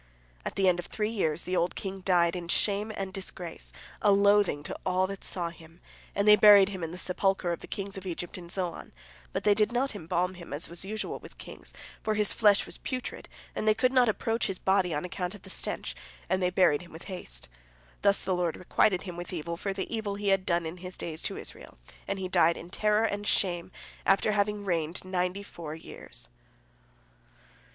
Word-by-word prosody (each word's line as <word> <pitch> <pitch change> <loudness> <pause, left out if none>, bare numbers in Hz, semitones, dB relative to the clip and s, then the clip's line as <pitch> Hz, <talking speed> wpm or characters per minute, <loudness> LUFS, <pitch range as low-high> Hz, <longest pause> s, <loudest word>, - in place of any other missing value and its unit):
At - - -4
the 195 -1 +3
end 175 -1 +4
of 175 - -5
three 215 0 -1
years 165 -7 0
the 185 - -2
old 175 0 +1
king 195 -1 -4
died 175 -2 +3
in 175 -1 -5
shame 205 +4 +2
and 195 -1 -3
disgrace, 180 -3 -5 0.3
a 205 - +5
loathing 200 -6 +4
to - - -5
all 185 +1 +2
that 195 +1 -6
saw 170 -2 -1
him, 165 0 -16 0.4
and 200 +1 +1
they 210 - +10
buried 205 -1 +8
him 190 -4 -5
in 165 - -2
the 175 - -7
sepulchre 185 -1 +1
of - - -5
the - - -10
kings 195 0 -4
of 190 0 -6
Egypt 175 +1 -4
in 175 -3 -8
Zoan, 180 -2 -4 0.4
but - - -2
they 205 - +6
did 210 +2 +2
not 255 +2 +1
embalm 180 0 -1
him, 170 -5 -9
as 145 +5 -1
was 170 +1 -2
usual 215 +2 -3
with - - -13
kings, - - -8 0.3
for 215 - 0
his 210 -1 +2
flesh 210 -3 +5
was - - -3
putrid, 255 -1 -5 0.2
and 215 - -3
they 215 - +6
could 255 +3 +2
not 250 -3 +5
approach 225 +2 0
his 195 - -3
body 190 -2 +2
on 150 +2 -1
account 180 +1 -3
of 205 - -14
the - - -8
stench, - - -1 0.3
and 185 +1 +1
they 180 - +3
buried 180 -5 +4
him 170 -2 -13
in 165 - -9
haste. 120 - -6 0.5
Thus 200 0 +3
the 190 - 0
Lord 175 -2 0
requited 185 +1 +2
him 180 -3 -6
with 175 +2 -5
evil 170 -1 -3
for 195 +3 -3
the 195 +4 -3
evil 210 -3 -2
he 200 0 -1
had 195 -1 +2
done 170 -1 +2
in 160 +3 -5
his 180 +1 -8
days 160 -2 -4
to - - -2
Israel, - - -7 0.3
and 200 - -1
he 190 -1 -3
died 170 -2 +4
in 170 - -10
terror 210 +2 +2
and 205 -2 -1
shame 175 -3 +2 0.4
after 195 +2 +4
having 205 0 0
reigned 170 -1 0
ninety 185 +1 -1
four 165 -6 -7
years. 160 - -8
185 Hz, 215 wpm, -29 LUFS, 175-205 Hz, 0.5 s, they